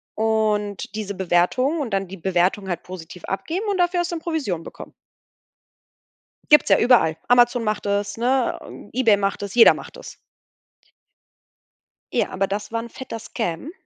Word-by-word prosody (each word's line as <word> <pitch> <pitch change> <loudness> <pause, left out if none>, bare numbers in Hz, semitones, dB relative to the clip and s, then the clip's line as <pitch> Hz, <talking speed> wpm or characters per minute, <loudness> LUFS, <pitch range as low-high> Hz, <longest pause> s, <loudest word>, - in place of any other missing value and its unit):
und 215 -3 0
diese 205 -2 -4
Bewertungen 190 - +1
und 250 -7 -3
dann 195 -1 -1
die 195 +2 -9
Bewertung 190 +2 0
halt 175 -2 -3
positiv 180 -1 -10
abgeben 335 - -3
und 395 - 0
dafür 350 0 +2
hast 345 - -3
du - - -2
dann 325 - -6
Provision 270 - -2
bekommen. - - -11 1.6
Gibt's 300 - +7
ja - - +6
überall. 230 -10 +4
Amazon 245 -1 +4
macht 215 -1 -2
das, 205 +1 -1
ne, 250 +1 +1 0.3
äh 255 - -3
Ebay 225 -5 +5
macht 200 0 -2
das, 200 +2 -6
jeder 235 - +8
macht - - -10
das. - - -11 2.0
Ja, - - +1
aber 195 +1 -1
das 205 +3 -5
war 230 - -1
'n 235 - -9
fetter 250 -2 -7
Scam 225 - -4
215 Hz, 165 wpm, -22 LUFS, 195-255 Hz, 2.0 s, jeder